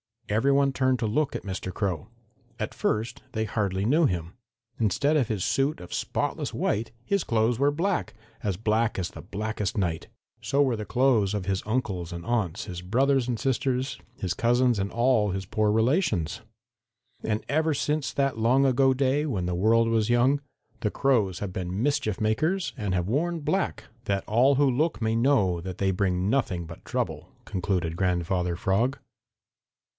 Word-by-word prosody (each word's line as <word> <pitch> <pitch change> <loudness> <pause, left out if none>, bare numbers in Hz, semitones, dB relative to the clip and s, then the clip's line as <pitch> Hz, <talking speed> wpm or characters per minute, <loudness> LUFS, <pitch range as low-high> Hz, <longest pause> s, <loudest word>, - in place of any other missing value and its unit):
"Every 115 +7 +2
one 140 0 +3
turned 130 -1 +1
to 115 - 0
look 145 +7 0
at - - -4
Mr. 95 -1 -5
Crow. 95 -8 -2 0.5
At - - -4
first 110 +2 -1
they 110 - 0
hardly 100 -2 -1
knew 155 +8 +4
him. 85 - -2 0.5
Instead 140 - +2
of 130 -6 +2
his 105 -5 -2
suit 135 +3 +1
of 90 - -9
spotless - - -2
white 110 +3 -1
his 200 +4 0
clothes 115 +1 +1
were 140 +1 +4
black, 175 +4 -1 0.3
as 100 -3 -1
black 110 +3 0
as 90 -2 -2
the - - -10
blackest 105 +1 -3
night. 85 -5 -1 0.3
So 140 - +1
were 130 -5 +2
the 105 - -5
clothes 120 -6 +2
of 100 -3 -2
his 95 0 0
uncles 95 -7 -2
and 85 0 -7
aunts, 110 -4 -1
his 90 -3 -6
brothers 130 +6 +2
and 120 -2 -1
sisters, 130 +1 -1 0.2
his 90 -2 -2
cousins 120 +2 +2
and 100 +1 -1
all 120 -3 +2
his 95 +1 -3
poor 105 +2 +1
relations. 110 - +1 0.8
"And 110 0 -1
ever 155 +2 +2
since 150 +1 -1
that 135 -4 0
long 125 +5 +4
ago 135 0 +4
day, 135 +3 +1
when 100 -12 -2
the 90 - -1
world 115 +6 +3
was 110 -1 +1
young, 125 +4 +3 0.4
the 105 - 0
Crows 110 -8 +1
have 100 -3 -4
been 95 +4 -3
mischief 140 -9 0
makers 155 - +1
and 100 -6 -1
have 90 +1 -1
worn 165 +6 0
black, 190 +6 -1 0.2
that 100 -2 0
all 125 +6 +4
who 145 +2 +4
look 150 +6 +1
may 110 0 +1
know 110 -8 +3
that 90 0 -6
they 95 -1 +1
bring 95 0 0
nothing 95 -10 0
but 85 0 -11
trouble," - - -3 0.2
concluded 90 -3 -2
Grandfather 90 -1 0
Frog. 115 +10 +1
110 Hz, 175 wpm, -26 LUFS, 95-135 Hz, 0.8 s, knew